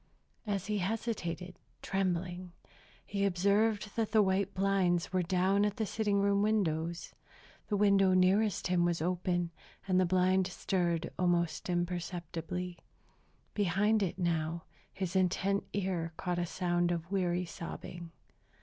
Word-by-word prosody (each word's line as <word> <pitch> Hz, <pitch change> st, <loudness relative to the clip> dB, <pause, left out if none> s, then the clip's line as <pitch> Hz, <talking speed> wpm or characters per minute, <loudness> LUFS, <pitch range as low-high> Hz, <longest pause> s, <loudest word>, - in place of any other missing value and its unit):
As 200 Hz, -2 st, -1 dB
he 210 Hz, -1 st, -1 dB
hesitated, 185 Hz, -4 st, -3 dB, 0.2 s
trembling, 180 Hz, -1 st, -2 dB, 0.5 s
he 200 Hz, -1 st, -2 dB
observed 200 Hz, +3 st, +2 dB
that 225 Hz, -2 st, -1 dB
the 215 Hz, -1 st, +6 dB
white 195 Hz, 0 st, +1 dB
blinds 190 Hz, -2 st, +1 dB
were 185 Hz, -, +3 dB
down 185 Hz, +3 st, +2 dB
at 205 Hz, -1 st, 0 dB
the 220 Hz, -, 0 dB
sitting 205 Hz, -1 st, 0 dB
room 200 Hz, 0 st, +3 dB
windows. 170 Hz, -6 st, 0 dB, 0.5 s
The 205 Hz, -, 0 dB
window 195 Hz, -2 st, +4 dB
nearest 195 Hz, +2 st, +3 dB
him 180 Hz, -1 st, +2 dB
was 175 Hz, -1 st, +1 dB
open, 175 Hz, 0 st, -1 dB, 0.4 s
and 185 Hz, -1 st, +3 dB
the 185 Hz, -, +3 dB
blind 185 Hz, +1 st, +3 dB
stirred 175 Hz, -3 st, -1 dB
almost 175 Hz, -1 st, +1 dB
imperceptibly. 175 Hz, 0 st, -3 dB, 0.7 s
Behind 205 Hz, +2 st, +2 dB
it, 185 Hz, -2 st, -1 dB
now, 170 Hz, -2 st, -1 dB, 0.3 s
his 190 Hz, -1 st, -4 dB
intent 190 Hz, +2 st, +1 dB
ear 180 Hz, -4 st, -2 dB
caught 175 Hz, -1 st, -2 dB
a 175 Hz, -, -1 dB
sound 175 Hz, -1 st, 0 dB
of 170 Hz, +1 st, -3 dB
weary 180 Hz, -2 st, 0 dB
sobbing. 170 Hz, 0 st, -7 dB
185 Hz, 130 wpm, -32 LUFS, 175-200 Hz, 0.7 s, the